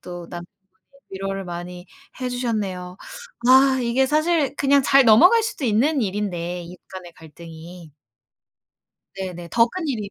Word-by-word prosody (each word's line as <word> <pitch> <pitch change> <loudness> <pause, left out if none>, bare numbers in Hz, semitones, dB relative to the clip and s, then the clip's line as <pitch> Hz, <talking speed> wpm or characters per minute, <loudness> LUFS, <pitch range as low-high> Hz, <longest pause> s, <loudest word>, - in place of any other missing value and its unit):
또 175 -1 -9
남편분이 175 0 -8 0.6
위로를 195 0 -5
많이 175 +1 -8 0.3
해 255 - -2
주셨네요. 205 -8 -4 0.5
아, 265 +1 +5
이게 245 +3 +1
사실 305 -1 +1
그냥 280 0 +3
잘 275 0 +5
넘어갈 355 - +6
수도 440 - -4
있는 260 +7 +1
일인데 180 -4 -3
이웃 175 +1 -12
간의 185 -2 -10
갈등이. 165 +1 -13 1.3
네네. 180 -3 -6
더 230 0 +4
큰 360 +5 -5
일이 215 -7 -4
200 Hz, 275 characters per minute, -22 LUFS, 175-265 Hz, 1.3 s, 넘어갈